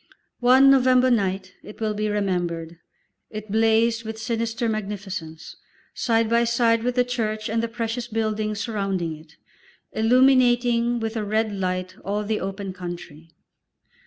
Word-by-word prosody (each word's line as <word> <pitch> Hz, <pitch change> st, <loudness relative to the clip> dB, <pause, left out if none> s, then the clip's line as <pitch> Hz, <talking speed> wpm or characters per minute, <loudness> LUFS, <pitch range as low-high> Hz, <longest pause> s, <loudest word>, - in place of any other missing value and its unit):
One 260 Hz, +2 st, +6 dB
November 255 Hz, -1 st, +4 dB
night, 190 Hz, -4 st, 0 dB
it 210 Hz, -, -12 dB
will 215 Hz, -1 st, -1 dB
be 215 Hz, 0 st, -2 dB
remembered, 175 Hz, -5 st, -2 dB, 0.5 s
it 215 Hz, -1 st, -8 dB
blazed 225 Hz, +1 st, +2 dB
with 220 Hz, 0 st, -6 dB
sinister 230 Hz, +1 st, -2 dB
magnificence, 195 Hz, -6 st, -5 dB, 0.4 s
side 230 Hz, -1 st, +1 dB
by 235 Hz, +1 st, +3 dB
side 230 Hz, -1 st, +2 dB
with 245 Hz, +1 st, -1 dB
the 250 Hz, -, +4 dB
church 220 Hz, -3 st, -2 dB
and 225 Hz, +1 st, 0 dB
the 230 Hz, -, -1 dB
precious 230 Hz, +1 st, -4 dB
buildings 215 Hz, -2 st, -2 dB
surrounding 195 Hz, -8 st, -2 dB
it, 155 Hz, +1 st, -17 dB, 0.6 s
illuminating 240 Hz, 0 st, +3 dB
with 225 Hz, 0 st, -3 dB
a 220 Hz, -, -1 dB
red 215 Hz, +1 st, 0 dB
light 185 Hz, -1 st, -3 dB
all 205 Hz, +2 st, -2 dB
the 215 Hz, +1 st, -1 dB
open 195 Hz, 0 st, -5 dB
country. 175 Hz, -3 st, -8 dB
220 Hz, 140 wpm, -23 LUFS, 195-235 Hz, 0.6 s, One